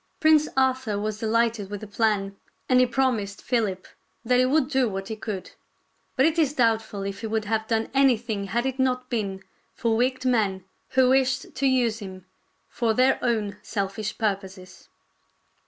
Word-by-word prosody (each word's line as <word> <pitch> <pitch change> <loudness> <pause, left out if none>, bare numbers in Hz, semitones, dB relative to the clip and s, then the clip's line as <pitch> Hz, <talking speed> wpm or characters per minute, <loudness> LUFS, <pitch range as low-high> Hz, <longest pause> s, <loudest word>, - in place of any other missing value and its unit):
Prince 310 -1 +5
Arthur 260 -5 +1
was 210 +1 -3
delighted 225 -2 0
with 205 -1 -6
the - - -6
plan, 205 -2 0 0.3
and 255 -1 +4
he 255 - +5
promised 235 -5 0
Philip 210 -7 -1 0.4
that 250 +1 +3
he 255 - +4
would 270 +1 +2
do 265 -4 +1
what 195 +1 -5
he 220 - -3
could. 210 -3 -6 0.6
But 265 - +4
it 325 +1 +2
is 295 -3 +2
doubtful 225 -6 0
if 200 +1 -5
he 225 - -3
would 220 0 -1
have 220 +1 -1
done 225 0 0
anything 240 -6 +2
had 235 +6 -1
it 265 0 -3
not 255 -1 0
been 195 -5 -2 0.3
for 230 -1 0
wicked 255 +2 0
men 205 -7 +1 0.3
who 255 -1 +6
wished 265 0 +1
to 275 - 0
use 240 -4 +1
him 185 -3 -9 0.4
for 230 -2 -1
their 260 +2 +3
own 215 -4 -1
selfish 205 0 -3
purposes. 190 -3 -4
225 Hz, 170 wpm, -25 LUFS, 205-255 Hz, 0.6 s, who